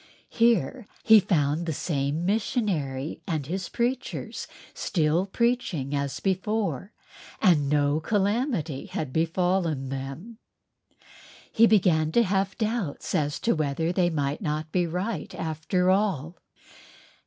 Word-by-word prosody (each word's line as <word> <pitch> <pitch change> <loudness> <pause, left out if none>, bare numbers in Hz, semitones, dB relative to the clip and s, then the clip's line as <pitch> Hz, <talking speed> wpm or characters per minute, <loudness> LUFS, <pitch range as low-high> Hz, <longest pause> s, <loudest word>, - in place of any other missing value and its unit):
Here 230 - +2 0.2
he 220 -1 +8
found 165 -4 0
the 160 - 0
same 145 +2 -1
missionary 180 - -1
with 155 -6 -2
his 180 +5 -4
preachers 245 +2 -3 0.3
still 165 +1 0
preaching 200 - 0
as 140 -1 -2
before—and 190 -5 -1
no 145 0 +2
calamity 205 - -1
had 180 -9 -4
befallen 165 -4 0
them! 135 - -6 1.1
He 230 +1 +5
began 170 -7 +3
to 235 - +5
have 195 -1 0
doubts 215 -8 -2
as 145 -1 0
to 235 - +2
whether 155 +1 -1
they 175 -1 +2
might 145 -1 -2
not 155 -2 -3
be 180 -2 +1
right 185 +6 -3
after 160 +4 0
all. 185 -5 0
175 Hz, 115 wpm, -26 LUFS, 150-205 Hz, 1.1 s, he